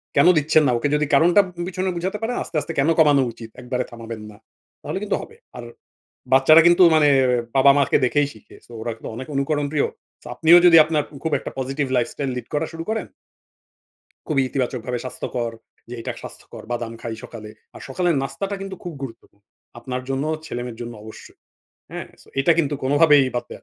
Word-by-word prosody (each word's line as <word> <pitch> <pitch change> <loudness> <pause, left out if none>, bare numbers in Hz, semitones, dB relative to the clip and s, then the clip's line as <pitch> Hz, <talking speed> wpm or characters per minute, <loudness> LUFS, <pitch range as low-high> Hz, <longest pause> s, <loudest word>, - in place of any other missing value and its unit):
কেন 140 +4 +5
দিচ্ছেন 155 +1 +3
না, - - +2
ওকে 145 - -1
যদি 150 0 +1
কারণটা 175 +5 +5 0.3
পিছনে 185 0 -2
বুঝাতে 190 +4 -3
পারেন 240 +2 -2
আস্তে, 165 - -12
আস্তে 165 +3 -6
কেন 140 +4 +3
কমানো 145 -3 +5
উচিত, 115 0 -11
একবারে 125 0 -2
থামাবেন 115 -1 -8
না। 105 - -16 0.4
তাহলে - - -4
কিন্তু 210 - 0
হবে। 455 - -12 0.2
আর - - -7 0.7
বাচ্চারা 155 +5 +7
কিন্তু 175 +1 +6
মানে 150 -1 +4 0.5
বাবা 140 +1 +7
মাকে 140 -2 +3
দেখেই 145 +3 +1
শিখে। 110 - -17
So - - -19
ওরা 115 - -3
কিন্তু - - -9
অনেক 130 +3 -7
অনুকরণ 145 +1 0
প্রিয়। 145 - +2 0.5
আপনিও 165 +6 +7
যদি 170 -2 +8
আপনার 155 -1 0 0.2
খুব 160 - -1
একটা - - -7
positive 135 +1 -2
lifestyle 130 +3 -2
lead 125 - -6
করা 150 +2 0
শুরু 165 0 -6
করেন 220 0 -2 1.2
খুবই 145 -4 +1
ইতিবাচকভাবে 125 -2 -3
স্বাস্থ্যকর, 120 -2 -4 0.4
যে 125 - -7
এটা - - -4
স্বাস্থ্যকর - - -11
বাদাম 115 -1 -3
খাই 115 -1 -5
সকালে। 110 -2 -9 0.3
আর - - -10
সকালের 175 +4 0
নাস্তাটা 195 +8 -4
কিন্তু 195 -1 -6
খুব 175 -2 -6
গুরুত্বপূর্ণ। 115 -4 -11 0.3
আপনার 125 -1 -5
জন্য, 135 +2 -1 0.2
ছেলেমেয়ের 120 -3 -6
জন্য 120 0 -6
অবশ্যই। 110 0 -13 0.5
হ্যাঁ, - - -6 0.3
এটা 150 +5 +4
কিন্তু 145 -2 +1
কোনোভাবেই 145 0 +5
বাদ 120 - -2
দেয়া - - -10
140 Hz, 180 wpm, -22 LUFS, 125-165 Hz, 1.2 s, যদি